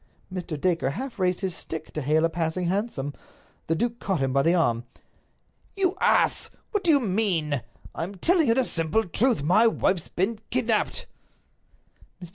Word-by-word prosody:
Mr. 175 -5 -4
Dacre 165 -5 +1
half 240 - -6
raised 180 0 +1
his 190 -2 -1
stick 160 -1 -6
to 155 - -3
hail 155 +4 +2
a - - +1
passing 165 +2 -2
hansom. 175 - -2 0.5
The 165 - +1
duke 235 +6 -2
caught 190 -4 -1
him 135 -1 0
by 140 - +3
the 165 +5 +3
arm. 120 -9 +1 0.9
"You 380 -2 +1
ass! - - +3 0.2
What 415 -3 -1
do 345 - +1
you 295 -3 +6
mean? 185 - +2 0.3
I - - -5
am 195 +4 -6
telling 330 - +3
you 230 - +4
the 260 0 +3
simple 165 +6 0
truth. 215 - +1
My 185 +9 +5
wife's 185 -6 0
been 205 +5 -1
kidnaped." 230 -3 0 1.1
Mr. 175 -2 -10
185 Hz, 175 wpm, -25 LUFS, 160-230 Hz, 1.1 s, you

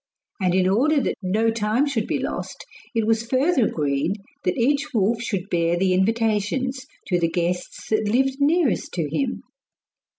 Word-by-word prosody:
And 180 -1 +2
in 185 -1 +3
order 275 +10 +3
that 265 - 0
no 215 +4 +1
time 225 +4 +1
should 245 -7 -1
be - - 0
lost - - -5 0.3
it 225 -1 +1
was 225 0 +2
further 260 +2 +2
agreed 145 +3 0 0.3
that - - 0
each 280 +3 +1
wolf 220 +2 +2
should 200 -5 -3
bear 170 0 +1
the 185 +1 +2
invitations 225 +6 0 0.2
to 180 -3 +1
the 165 -1 +1
guests 175 +1 -3
that 215 -1 +1
lived 265 +3 +2
nearest 300 - +2
to 165 -4 -1
him. 250 - -2
220 Hz, 165 wpm, -23 LUFS, 185-260 Hz, 0.3 s, in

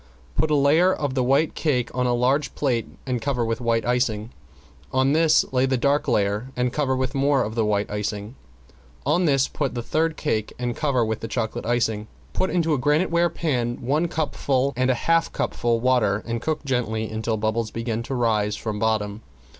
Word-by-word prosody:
Put 155 - +1
a 150 - +3
layer 150 +6 +4
of 145 -7 -2
the 130 -1 +1
white 140 +5 +2
cake 125 -6 0
on 125 0 0
a 120 - +2
large 130 +5 +1
plate 125 -6 0 0.2
and 125 -3 -2
cover 125 -3 0
with 115 +1 -2
white 115 -1 +1
icing, 120 -2 0 0.6
on 130 +2 +2
this 160 0 +4
lay 130 0 +3
a 130 -1 +1
dark 140 +4 +1
layer 105 -1 +1
and 125 0 0
cover 140 -3 +1
with 130 +1 -1
more 140 -1 +2
of 110 - -4
the 115 -1 +1
white 105 -1 +1
icing. 105 +1 -3 0.7
On 180 +1 +2
this 135 -3 +3
put 140 -4 -3
the 120 - -3
third 160 +4 0
cake 110 -8 -1
and 120 -1 -2
cover 135 -6 +1
with 110 0 -2
the 115 - -5
chocolate 110 -1 -3
icing. 110 -3 0 0.3
Put 190 - 0
into 165 -3 +1
a 145 - +1
graniteware 170 +5 +2
pan 125 -8 -1
one 150 +7 0
cupful 140 -4 0
and 130 +1 +1
a 130 - +3
half 165 0 +3
cupful 120 -1 0
water 115 -5 +2
and 115 0 -3
cook 155 0 -2
gently 110 -4 -1
until 110 +1 -2
bubbles 110 +1 -1
begin 115 0 -3
to 135 +3 -4
rise 110 -4 +1
from 105 -2 -4
bottom. 110 -1 0
125 Hz, 195 wpm, -24 LUFS, 115-140 Hz, 0.7 s, layer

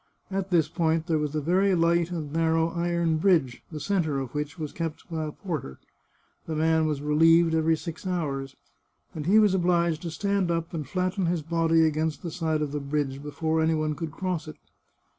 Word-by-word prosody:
At 195 0 -2
this 165 -4 +3
point 160 0 0
there 160 -3 +1
was 150 0 -2
a 155 - 0
very 185 +5 +2
light 170 0 +2
and 155 -5 -5
narrow 165 0 +2
iron 170 -1 0
bridge, 155 -8 +2
the 155 - -5
centre 160 -6 0
of 130 -3 -5
which 150 +1 -4
was 155 -3 -4
kept 165 -2 -5
by 160 -1 -2
a 150 - -4
porter. 150 - -5 0.7
The 160 - -3
man 160 0 +2
was 145 -2 -2
relieved 165 +2 +4
every 160 0 +2
six 170 +3 -7
hours, 140 -7 -2 0.6
and 155 -1 -5
he 205 +4 +5
was 210 -3 +5
obliged 170 -3 +2
to 170 - -4
stand 200 +1 0
up 165 0 -2
and 155 -5 -4
flatten 185 0 -1
his 170 -2 -1
body 165 0 +3
against 155 0 -1
the 170 - -4
side 160 -3 -1
of 145 - -3
the 150 - -2
bridge 140 -1 -2
before 160 +2 -1
any 160 0 +2
one 155 -1 0
could 155 +1 -5
cross 180 -1 -3
it. 155 - -8
160 Hz, 200 wpm, -26 LUFS, 155-170 Hz, 0.7 s, he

